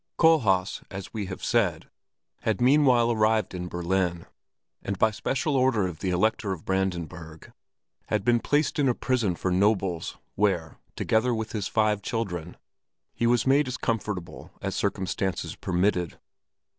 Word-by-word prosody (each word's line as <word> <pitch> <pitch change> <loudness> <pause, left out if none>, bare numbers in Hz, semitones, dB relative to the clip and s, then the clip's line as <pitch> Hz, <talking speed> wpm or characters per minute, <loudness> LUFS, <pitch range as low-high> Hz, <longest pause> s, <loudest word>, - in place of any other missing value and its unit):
Kohlhaas, 110 - +3
as 95 0 -8
we 105 -4 -3
have 95 - -7
said, 95 -9 +1 0.5
had 110 -3 -1
meanwhile 125 -2 +4
arrived 110 -1 +2
in 90 -1 -4
Berlin, 85 0 -1 0.6
and 100 0 -3
by 110 +3 +3
special 135 +7 -1
order 130 -6 +3
of 90 -3 -5
the 95 - -2
Elector 100 +3 +1
of 85 - -9
Brandenburg 85 -4 -3 0.5
had 105 -2 -1
been 120 -1 +4
placed 150 +5 +1
in 140 -2 +3
a 120 - +1
prison 115 -8 0
for 90 +2 -2
nobles, 95 -2 +1 0.2
where, 95 -6 0 0.2
together 115 +2 +1
with 110 0 -4
his 105 -3 -2
five 105 -2 +1
children, 90 -7 -4 0.6
he 115 - 0
was 120 -1 +3
made 135 +2 +4
as 125 - -3
comfortable 105 -6 -3
as - - -3
circumstances 95 0 -2
permitted. 90 -1 0
105 Hz, 145 wpm, -26 LUFS, 90-120 Hz, 0.6 s, meanwhile